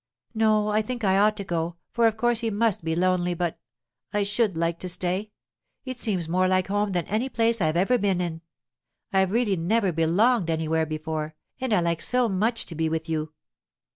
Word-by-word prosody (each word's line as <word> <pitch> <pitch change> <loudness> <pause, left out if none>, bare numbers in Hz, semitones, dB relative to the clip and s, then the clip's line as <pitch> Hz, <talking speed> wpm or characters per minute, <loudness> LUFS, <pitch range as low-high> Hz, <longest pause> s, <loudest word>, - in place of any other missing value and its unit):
'No, 215 -1 +2
I 210 +1 +2
think 240 +1 -5
I 190 -1 +3
ought 210 +1 +3
to 200 - -4
go, 170 -2 -2 0.2
for 235 -1 +3
of 220 -1 -1
course 240 0 +2
he 230 -1 -1
must 215 -3 0
be 160 0 -1
lonely 180 0 +1
but—I 160 - -5
should 205 -2 0
like 170 0 -1
to 185 - -2
stay! 185 +3 -1 0.6
It 255 -1 -6
seems 185 -7 -1
more 185 +3 +2
like 185 0 +1
home 205 0 0
than 175 -3 0
any 220 +7 -1
place 230 -2 +1
I've 155 0 +1
ever 220 +8 +3
been 195 -3 +1
in. 165 -2 -3 0.7
I've 190 -1 +3
really 220 -4 +1
never 195 +4 +1
belonged 175 +5 +2
anywhere 160 0 0
before, 155 0 -4 0.2
and 260 -2 -2
I 210 - +3
like 170 -1 -1
so 250 -1 +2
much 220 +4 0
to - - -8
be 160 0 -1
with 160 +1 -3
you. 155 -1 -2
185 Hz, 200 wpm, -25 LUFS, 165-220 Hz, 0.7 s, I